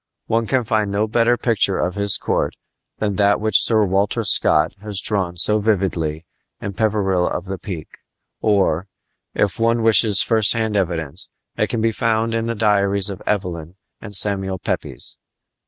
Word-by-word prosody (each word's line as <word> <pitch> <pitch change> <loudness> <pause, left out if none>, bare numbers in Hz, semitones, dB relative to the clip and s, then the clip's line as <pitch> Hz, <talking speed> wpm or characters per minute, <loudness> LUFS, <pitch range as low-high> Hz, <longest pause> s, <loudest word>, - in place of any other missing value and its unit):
One 115 0 0
can 130 0 +1
find 110 -3 0
no 100 +2 0
better 115 +2 +2
picture 110 -6 0
of 90 - -1
his 100 -1 -1
court - - -2 0.4
than 100 -3 -2
that 100 0 +3
which 110 -1 +3
Sir 110 -2 +2
Walter 100 +2 0
Scott 75 +2 +2
has 105 -2 -2
drawn 95 -4 -1
so 105 +5 +5
vividly 90 -7 -1 0.3
in 100 - -5
Peveril 100 -4 0
of 90 - -4
the 95 -1 -6
Peak; 90 -7 -8 0.4
or, 100 -4 +1 0.5
if 105 0 0
one 115 0 +1
wishes 110 -3 +5
first 110 -3 +3
hand 110 -2 -2
evidence, 85 -4 -2 0.3
it - - 0
can 115 - -2
be 115 0 +2
found 115 0 0
in 115 0 -1
the 115 - -2
diaries 100 -2 +1
of 95 - -8
Evelyn 90 -4 -3 0.3
and 105 -2 -9
of - - +4
Samuel 95 -1 +3
Pepys. - - -3
100 Hz, 170 wpm, -20 LUFS, 95-110 Hz, 0.5 s, so